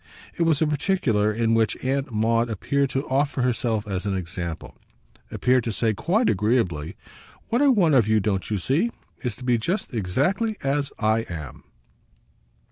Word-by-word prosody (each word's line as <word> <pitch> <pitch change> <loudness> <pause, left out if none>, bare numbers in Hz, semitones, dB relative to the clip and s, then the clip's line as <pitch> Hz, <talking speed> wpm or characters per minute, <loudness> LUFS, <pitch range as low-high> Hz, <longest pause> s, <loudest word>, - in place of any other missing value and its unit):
It - - -4
was 160 -2 +3
a - - +3
particular 145 - +1
in 115 +1 +1
which 115 -1 +2
Aunt 135 0 -1
Maud 115 +2 +1
appeared 140 +6 0
to 135 +2 -2
offer 135 -1 0
herself 115 -3 0
as 95 0 -3
an 100 - 0
example, 85 -2 -6 0.5
appeared 125 -1 +2
to 115 - -1
say 110 +1 0
quite 205 - +1
agreeably: 95 -7 0 0.5
"What 240 +4 +1
I 290 - +5
want 195 - +4
of 120 -6 +4
you, 110 0 +3
don't 95 -2 -1
you 105 - 0
see? 140 - +1 0.3
is 120 -5 -3
to 125 - -12
be 125 -2 +2
just 175 - -2
exactly 145 - 0
as 140 +1 0
I 110 0 +2
am." 80 -5 -8
120 Hz, 170 wpm, -24 LUFS, 105-140 Hz, 0.5 s, I